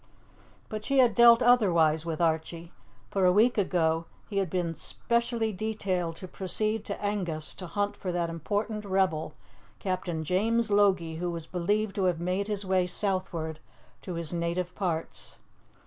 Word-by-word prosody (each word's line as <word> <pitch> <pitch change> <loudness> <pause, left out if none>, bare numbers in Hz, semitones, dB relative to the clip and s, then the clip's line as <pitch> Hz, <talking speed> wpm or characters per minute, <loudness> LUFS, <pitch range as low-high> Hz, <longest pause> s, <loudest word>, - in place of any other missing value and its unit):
But 215 -1 -5
she 275 +4 0
had 245 -4 +5
dealt 235 +1 +7
otherwise 170 -10 +4
with 160 -2 -3
Archie; 165 +1 -1 0.4
for 195 - +1
a 180 - +6
week 220 +6 +4
ago 165 -4 +1 0.2
he 200 - -4
had 190 -3 -1
been 175 -1 -1
specially 235 +4 -1
detailed 185 -5 -2
to 185 - -9
proceed 215 +4 -2
to 200 - -5
Angus 180 -7 -2
to 180 - -8
hunt 205 +4 -1
for 185 - -4
that 175 -1 0
important 205 +6 -3
rebel, 185 -6 0 0.4
Captain 180 -4 -3
James 220 +6 +1
Logie, 190 -6 +3
who 175 +1 -2
was 170 -2 -5
believed 200 +4 -1
to 195 - +1
have 175 -3 +1
made 185 +3 -1
his 205 -2 -3
way 185 -1 +2
southward 180 -5 -2 0.4
to 180 - -6
his 165 0 -3
native 170 +1 -2
parts. 165 -4 -4
185 Hz, 160 wpm, -28 LUFS, 170-210 Hz, 0.4 s, dealt